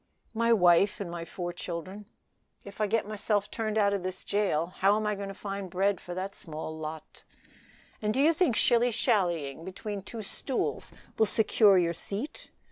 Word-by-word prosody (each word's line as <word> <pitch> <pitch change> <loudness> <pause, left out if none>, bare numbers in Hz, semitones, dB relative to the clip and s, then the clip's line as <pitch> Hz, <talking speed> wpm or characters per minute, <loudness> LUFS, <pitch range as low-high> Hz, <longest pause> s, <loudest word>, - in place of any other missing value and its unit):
"My 230 +1 +2
wife 185 -1 +5
and 190 -4 -4
my 170 -1 -5
four 175 0 -5
children; 185 +4 -6 0.6
if 200 +2 -8
I 210 - +3
get 220 0 0
myself 210 -1 -1
turned 220 -1 -2
out 200 -1 +3
of 200 - -1
this 185 +1 -5
jail 185 -4 0
how 195 +2 +4
am 215 0 -1
I 210 - +1
to 200 -1 -5
find 200 -1 -5
bread 195 +2 +1
for 175 - -7
that 190 +2 -4
small 160 -2 -6
lot?" 155 0 -8 0.8
"And 210 -1 +1
do 250 - -1
you 310 +4 +5
think 315 -7 +2
shilly 240 +2 +4
shallying 175 - 0
between 195 +2 -5
two 220 +3 -7
stools 255 +6 -2 0.3
will 220 - +5
secure 210 -2 +5
your 170 -1 +2
seat? 205 - -6
200 Hz, 180 wpm, -29 LUFS, 175-215 Hz, 0.8 s, wife